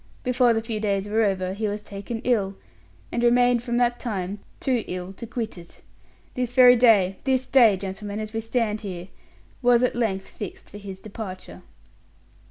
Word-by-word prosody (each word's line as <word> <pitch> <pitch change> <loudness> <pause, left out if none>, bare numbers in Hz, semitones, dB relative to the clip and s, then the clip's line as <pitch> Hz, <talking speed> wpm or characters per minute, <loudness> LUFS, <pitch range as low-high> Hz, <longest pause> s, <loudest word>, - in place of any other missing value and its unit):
Before 250 -1 +3
the 225 -1 0
few 225 -2 -3
days 200 -2 -1
were 220 +2 +1
over, 190 -3 0
he 215 +2 -2
was 210 +1 -4
taken 205 +3 -6
ill, 200 -6 +1 0.6
and 240 - -1
remained, 245 0 +4
from 240 0 -2
that 240 0 +2
time, 200 -4 -4 0.2
too 250 -5 0
ill 180 +1 -5
to 235 - -9
quit 225 -5 -4
it. 170 - -15 0.5
This 250 -1 -2
very 250 0 +8
day 210 -6 +4
this 260 -1 +1
day, 230 -7 +5
gentlemen, 200 +2 -5
as 215 0 -5
we 225 - -2
stand 225 -2 -1
here, 185 -3 -7 0.5
was 245 -1 +4
at 250 - +2
length 200 -5 -1
fixed 205 - -9
for 205 - -9
his 195 -2 -8
departure." 200 -3 -8
220 Hz, 180 wpm, -24 LUFS, 195-240 Hz, 0.6 s, very